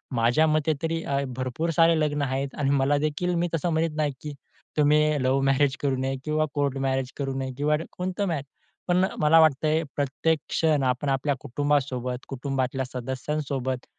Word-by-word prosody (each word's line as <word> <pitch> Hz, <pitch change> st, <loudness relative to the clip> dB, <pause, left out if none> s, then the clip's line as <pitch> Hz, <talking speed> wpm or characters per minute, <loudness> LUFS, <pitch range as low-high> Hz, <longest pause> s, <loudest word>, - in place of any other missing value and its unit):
माझ्या 120 Hz, +7 st, +3 dB
मते 155 Hz, 0 st, +2 dB
तरी 165 Hz, 0 st, -1 dB
अ, 140 Hz, 0 st, -1 dB, 0.2 s
भरपूर 130 Hz, +6 st, -2 dB
सारे 165 Hz, -1 st, +5 dB
लग्न 150 Hz, -1 st, 0 dB
आहेत 135 Hz, 0 st, -2 dB
आणि 140 Hz, -, +1 dB
मला 140 Hz, +1 st, +2 dB
देखील 155 Hz, +4 st, -1 dB
मी 175 Hz, +1 st, +1 dB
तसं 165 Hz, +2 st, -1 dB
म्हणत 160 Hz, -1 st, 0 dB
नाही, 150 Hz, -2 st, +1 dB
की 150 Hz, -1 st, -6 dB, 0.4 s
तुम्ही 150 Hz, 0 st, +5 dB, 0.2 s
लव्ह 130 Hz, +1 st, +2 dB
मॅरेज 135 Hz, 0 st, +3 dB
करू 140 Hz, -2 st, +1 dB
नये 135 Hz, +1 st, -2 dB
किंवा 155 Hz, 0 st, +1 dB
कोर्ट 140 Hz, -2 st, 0 dB
मॅरेज 130 Hz, -1 st, -1 dB
करू 135 Hz, -2 st, -2 dB
नये 130 Hz, 0 st, -3 dB
किंवा 150 Hz, +1 st, +2 dB, 0.2 s
कोणतं 185 Hz, +2 st, -2 dB
मॅरे 160 Hz, -6 st, -2 dB, 0.4 s
पण 180 Hz, +1 st, +3 dB
मला 155 Hz, +2 st, +6 dB
वाटतंय 155 Hz, +1 st, +3 dB
प्रत्येक 145 Hz, +3 st, 0 dB
क्षण 155 Hz, -4 st, +2 dB
आपण 130 Hz, +2 st, 0 dB
आपल्या 135 Hz, +1 st, 0 dB
कुटुंबासोबत 130 Hz, -2 st, -1 dB
कुटुंबातल्या 130 Hz, -1 st, -2 dB
सदस्यांसोबत 130 Hz, +1 st, -3 dB
145 Hz, 165 wpm, -26 LUFS, 130-155 Hz, 0.4 s, मला